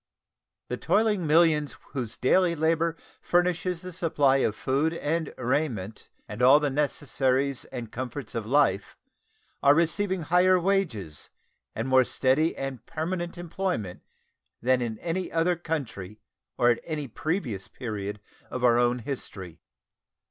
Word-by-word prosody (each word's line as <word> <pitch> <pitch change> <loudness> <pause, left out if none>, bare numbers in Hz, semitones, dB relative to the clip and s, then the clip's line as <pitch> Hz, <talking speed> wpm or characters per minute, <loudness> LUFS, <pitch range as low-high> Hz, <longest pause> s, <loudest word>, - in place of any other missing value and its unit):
The 125 - -2
toiling 200 - +1
millions 150 -5 +3
whose 120 -5 -4
daily 170 +7 +3
labor 165 +1 +1 0.2
furnishes 180 0 0
the 180 0 -7
supply 150 -6 +2
of 110 -5 +1
food 145 +7 0
and 160 0 -2
raiment 120 -6 -2 0.2
and 105 +3 -6
all 135 +4 +7
the 145 -2 0
necessaries 135 -2 0
and 120 -4 -7
comforts 125 -1 -5
of 110 -2 -4
life 110 -8 +2 0.6
are 140 +1 +6
receiving 185 +2 +1
higher 180 +3 +4
wages 160 - -1 0.5
and 115 +3 -2
more 130 0 +5
steady 135 +6 +1
and 135 -3 -5
permanent 170 +2 -3
employment 175 - -3 0.6
than 130 +1 +2
in 115 -2 -3
any 175 +7 -3
other 165 +2 +2
country 125 - -5 0.4
or 120 0 +5
at 120 - 0
any 150 -3 -4
previous 125 - -3
period 105 -4 -5 0.3
of 130 - -5
our 120 -1 +5
own 120 0 +2
history. 105 - -7
145 Hz, 135 wpm, -27 LUFS, 120-170 Hz, 0.6 s, all